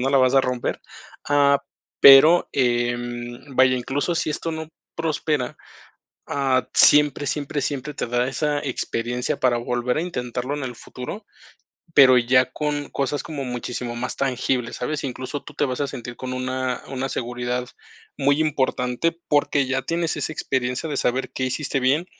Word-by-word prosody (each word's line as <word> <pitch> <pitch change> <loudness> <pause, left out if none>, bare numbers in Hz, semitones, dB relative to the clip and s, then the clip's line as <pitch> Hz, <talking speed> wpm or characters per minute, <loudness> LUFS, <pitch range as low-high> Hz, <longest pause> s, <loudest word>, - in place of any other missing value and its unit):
¿no? 135 +2 0
La 140 - +4
vas 130 0 +3
a 135 - +7
romper, 125 -2 -2 0.5
ah, 140 -1 +4 0.4
pero, 145 +6 +8
em, 120 +1 -2
vaya, 130 0 +4
incluso 140 +7 -1
si 165 - -1
esto 165 +2 -3
no 160 0 -6 0.3
prospera. 155 -4 -1 0.7
Ah, 135 -2 +1
siempre, 145 -1 +5
siempre, 145 +1 -2
siempre 145 +1 -3
te 140 - -3
da 120 +1 0
esa 150 +2 -1
experiencia 125 0 -3
para 125 -2 +2
volver 120 +2 -1
a - - 0
intentarlo 125 -5 -3
en 145 - -4
el 125 -2 -5
futuro, 125 - -8 0.7
pero 130 -3 +8
ya 130 +1 +3
con 145 -1 -3
cosas 140 +1 -2
como 150 -4 -5
muchísimo 125 -1 -4
más 125 +2 -4
tangibles, 125 -2 -1
¿sabes? 150 +5 -3
Incluso 130 +2 -5
tú 150 - -12
te 145 - +1
vas 130 0 -3
a 140 - 0
sentir 120 -1 -7
con 130 +1 -6
una 130 0 -2
una 135 0 -3
seguridad 125 0 -3 0.5
muy 140 +1 +2
importante 140 +1 0
porque 145 -1 +2
ya 130 +1 -1
tienes 165 +4 -1
esa - - -3
experiencia 130 -1 -2
de 145 - -3
saber 130 +2 0
qué 130 - -2
hiciste 135 +1 -1
bien, 135 +6 +2
130 Hz, 160 wpm, -23 LUFS, 125-145 Hz, 0.7 s, pero